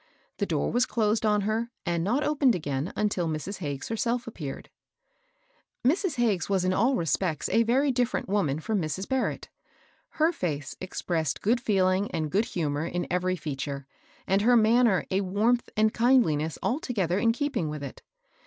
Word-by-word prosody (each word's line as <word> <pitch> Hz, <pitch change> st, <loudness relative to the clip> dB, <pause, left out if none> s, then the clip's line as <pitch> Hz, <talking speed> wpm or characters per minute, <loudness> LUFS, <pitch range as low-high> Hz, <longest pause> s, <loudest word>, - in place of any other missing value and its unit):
The 200 Hz, -, 0 dB
door 155 Hz, -4 st, 0 dB
was 245 Hz, +1 st, +2 dB
closed 220 Hz, -1 st, +1 dB
on 210 Hz, -1 st, +3 dB
her, 220 Hz, +3 st, -1 dB, 0.2 s
and 170 Hz, -2 st, 0 dB
not 245 Hz, -, +1 dB
opened 285 Hz, -5 st, +3 dB
again 145 Hz, 0 st, -3 dB
until 205 Hz, -5 st, 0 dB
Mrs. 160 Hz, +6 st, -4 dB
Hagges 140 Hz, -6 st, -4 dB
herself 235 Hz, +2 st, -1 dB
appeared. 155 Hz, -12 st, -7 dB, 1.1 s
Mrs. 335 Hz, +4 st, +2 dB
Hagges 215 Hz, -8 st, +1 dB
was 190 Hz, -2 st, +1 dB
in 185 Hz, -, +2 dB
all 240 Hz, +8 st, +2 dB
respects 165 Hz, -, 0 dB
a 230 Hz, -, +3 dB
very 260 Hz, +4 st, +2 dB
diflFerent 250 Hz, 0 st, 0 dB
woman 185 Hz, -8 st, 0 dB
from 210 Hz, +3 st, -1 dB
Mrs. 170 Hz, +5 st, -3 dB
Barrett. 265 Hz, -1 st, -2 dB, 0.7 s
Her 320 Hz, +2 st, +4 dB
fece 150 Hz, -, -3 dB
expressed 165 Hz, -5 st, -2 dB
good 235 Hz, +4 st, +2 dB
feeling 190 Hz, -2 st, +2 dB
and 155 Hz, -3 st, -3 dB
good 210 Hz, +4 st, +2 dB
humor 155 Hz, -, -2 dB
in 175 Hz, 0 st, -2 dB
every 180 Hz, +1 st, +1 dB
feature, 140 Hz, -4 st, -5 dB, 0.4 s
and 195 Hz, +1 st, +2 dB
her 240 Hz, +3 st, +5 dB
manner 225 Hz, -3 st, +4 dB
a 190 Hz, +1 st, +2 dB
warmth 215 Hz, +6 st, +1 dB
and 215 Hz, 0 st, +3 dB
kindliness 215 Hz, -, +2 dB
alto 265 Hz, +1 st, -1 dB
gether 185 Hz, -2 st, +1 dB
in 230 Hz, +2 st, +3 dB
keeping 260 Hz, -, -1 dB
with 150 Hz, -1 st, -5 dB
it. 140 Hz, -, -8 dB
200 Hz, 170 wpm, -27 LUFS, 165-235 Hz, 1.1 s, her